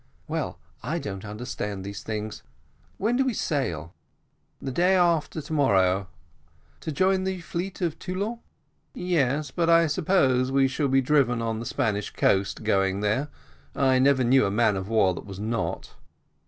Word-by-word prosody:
"Well, - - -3 0.2
I 150 +8 -2
don't 95 - -5
understand 105 -2 -5
these 100 0 -6
things. 110 -1 -5 0.6
When 230 +5 +1
do 270 - +3
we 260 -4 -1
sail?" 90 - -2 0.7
"The 135 - -4
day 180 +7 +3
after 170 -3 +1
to 160 +3 -6
morrow." 95 -9 +3 0.7
"To 160 - -5
join 185 +4 +2
the 190 -1 -2
fleet 180 +3 -4
off 165 -3 -2
Toulon?" 200 +6 -3 0.6
"Yes; 150 -5 0
but 170 -1 0
I 165 0 +6
suppose 140 -6 +2
we 135 0 +4
shall 140 +2 -1
be 135 0 +3
driven 130 -3 +2
on 115 -1 -2
the 115 - -5
Spanish 105 -7 -1
coast 100 +2 +1
going 95 -2 +1
there. 110 +8 0 0.5
I 130 -2 +3
never 135 0 +4
knew 130 +2 +4
a - - 0
man 105 0 +2
of 95 +1 -4
war 105 -5 +3
that 90 - -9
was 95 -1 -8
not." 105 -6 -3
130 Hz, 165 wpm, -26 LUFS, 105-165 Hz, 0.7 s, I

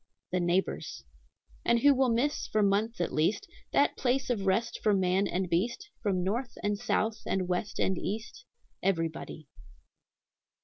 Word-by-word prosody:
The 180 - +1
neighbors. 175 +2 -1 0.6
"And 235 0 +3
who 285 +2 +7
will 265 -1 +3
miss, 270 +6 0
for 215 -1 +2
months 205 +3 +1
at 175 - -1
least, 165 +7 +1 0.2
That - - +3
place 255 0 0
of 200 -5 -1
rest 225 +5 +1
for 210 -2 +3
man 190 +1 +2
and 185 +1 -1
beast, 235 - -1
from 190 -5 0
North, 235 +7 -2
and 205 0 +1
South, 220 +1 0
and 185 -2 0
West, 180 +3 -2
and 190 -2 +1
East? 215 +3 -5 0.4
Everybody." 165 -4 -2
200 Hz, 150 wpm, -30 LUFS, 185-235 Hz, 0.6 s, who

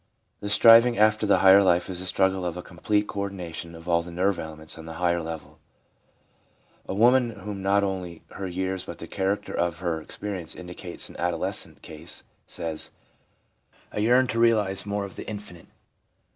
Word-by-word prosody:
The 100 - -5
striving 115 +3 +7
after 110 0 +3
the 100 - +5
higher 95 +1 +9
life 90 -2 +3
is 90 -2 -4
the 95 - -4
struggle 95 -1 +1
after 85 +1 -4
a - - -19
complete 105 +4 0
co 100 - -5
ordination 90 -4 -5
of 80 +1 -12
all 85 -1 +3
the 85 - -9
nerve 95 +3 0
elements 80 -1 -6
on 80 - -10
the 80 - -6
higher 85 0 +1
level. 80 -1 -8 1.3
A - - -3
woman 120 +3 +5
in 115 - -10
whom 105 -2 -6
not 100 +1 +3
only 90 -4 -4
her 95 - -5
years 95 +1 -2
but 85 - -8
the - - -8
character 95 +3 -2
of 85 -1 0
her 85 -2 -2
experience 95 +1 -6
indicates 90 0 -6
an - - -11
adolescent 85 -1 -2
case, 80 +2 -9 0.2
says: 80 -2 -2 0.5
' - - -35
I - - -2
yearn 125 +4 +4
to 115 - -1
realise 105 -4 +3
more 100 0 -1
of 100 - -11
the - - -7
infinite.' 105 -5 -8
95 Hz, 185 wpm, -26 LUFS, 85-105 Hz, 1.3 s, higher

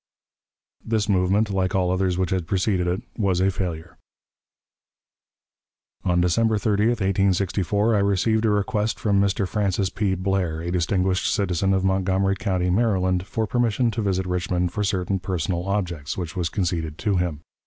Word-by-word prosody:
This 110 -2 0
movement, 100 +2 +2
like 95 0 0
all 90 -1 +2
others 95 -1 0
which 95 0 -1
had 90 -3 -1
preceded 95 -1 0
it, 90 +2 -1 0.2
was 95 -4 +1
a 95 +1 +3
failure. 85 -3 -5 2.0
On 90 -1 +2
December 110 +6 +2
30, 105 +1 +1
1864, 100 -1 +1
I - - +3
received 100 +3 +1
a - - +3
request 105 +1 0
from 100 -2 +2
Mr. 100 -1 +1
Francis 95 -2 0
P. 100 -2 0
Blair, 95 -3 -1
a 85 +1 -4
distinguished 90 +1 +1
citizen 95 -1 0
of 95 -1 +1
Montgomery 95 0 +1
County, 90 -3 -1
Maryland, 95 -3 +1
for 110 +1 -1
permission 120 +1 +1
to 110 - -3
visit 95 -2 0
Richmond 90 -1 -1
for 105 - -1
certain 95 -1 -1
personal 90 -1 -2
objects, 85 -7 -2
which 90 0 -5
was 85 -3 -1
conceded 80 -4 -2
to 100 0 0
him. 85 -5 -2
95 Hz, 155 wpm, -23 LUFS, 90-100 Hz, 2.0 s, a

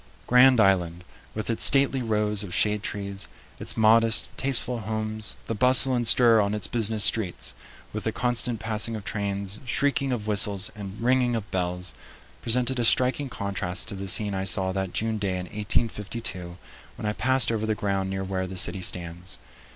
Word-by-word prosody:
Grand 125 0 +5
Island, 90 -4 +1 0.3
with 110 +2 -3
its 115 - +3
stately 135 -1 +6
rows 105 -3 0
of 95 -4 -4
shade 105 -1 +1
trees, 100 -2 -5 0.3
its - - -4
modest, 115 0 +3
tasteful 125 -2 +1
homes, 110 0 -3
the - - -4
bustle 130 +3 +4
and 120 -2 +1
stir 115 0 +6
on 100 +1 -2
its 105 - -1
business 110 -2 0
streets, 105 -5 -2 0.4
with 105 - -5
the 110 - -1
constant 120 -1 +2
passing 110 +1 -2
of 105 - -7
trains, 100 0 -5
shrieking 140 +1 -1
of 115 -4 -4
whistles, 100 -1 +3
and 100 -1 -9
ringing 125 0 +1
of 110 -2 -6
bells, 90 -1 -2 0.5
presented 125 +2 0
a - - 0
striking 130 +4 +1
contrast 100 -4 -3
to - - -6
the 100 0 -7
scene 100 +2 +2
I 95 0 -3
saw 95 0 +1
that 95 -1 -4
June 110 +1 -3
day 100 -2 -2
in 90 - -6
1852 105 -3 -3 0.4
when - - -8
I 105 - -1
passed 130 0 +2
over 110 -1 -3
the 110 - -1
ground 95 -2 -3
near 95 0 -4
where 95 -1 -4
the 95 0 -7
city 90 +2 +3
stands. 90 +1 -3
105 Hz, 180 wpm, -24 LUFS, 95-115 Hz, 0.5 s, stately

